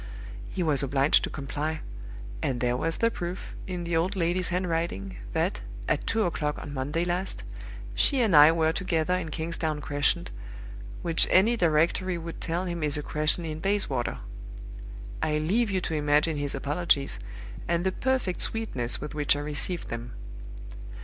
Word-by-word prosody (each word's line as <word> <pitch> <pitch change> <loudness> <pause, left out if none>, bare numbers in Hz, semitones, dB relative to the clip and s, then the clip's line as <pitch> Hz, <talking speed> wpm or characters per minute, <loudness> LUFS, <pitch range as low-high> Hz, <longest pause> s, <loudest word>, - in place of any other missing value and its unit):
He 185 - -2
was 150 -4 +3
obliged 140 +1 +3
to - - -5
comply; 150 +2 -3 0.6
and 130 -3 -1
there 120 0 +1
was 165 +6 -1
the 230 0 +2
proof, 175 -1 -5
in 180 -2 -3
the 170 0 -1
old 180 +5 +1
lady's 180 0 0
handwriting, 165 - -2 0.2
that, - - 0 0.3
at - - 0
two 225 -1 +2
o'clock 150 -5 -1
on 145 - -7
Monday 145 +5 -1
last, 180 +2 -1 0.5
she 275 - +3
and 215 -8 +3
I 150 +1 +10
were 160 -1 +2
together 175 -2 0
in 180 -3 -3
Kingsdown 160 -1 -2
Crescent, 145 +4 0 0.7
which 165 -2 +4
any 215 +6 +5
directory 175 0 +2
would 165 0 -7
tell 175 +2 -1
him 170 -2 -3
is 150 -1 +2
a 150 - -3
'crescent' 155 +3 0
in 155 -1 -4
Bayswater! 190 -10 +1 1.0
I 150 -1 +1
leave 205 +10 +1
you 190 -2 0
to 165 - -3
imagine 150 +1 +2
his 145 -1 -2
apologies, 140 0 +1 0.5
and 170 0 +1
the 190 - +2
perfect 255 -4 0
sweetness 130 - 0
with 150 0 -6
which 145 -1 +2
I - - -3
received 150 +4 -3
them. 115 +1 -5
165 Hz, 165 wpm, -27 LUFS, 150-180 Hz, 1.0 s, I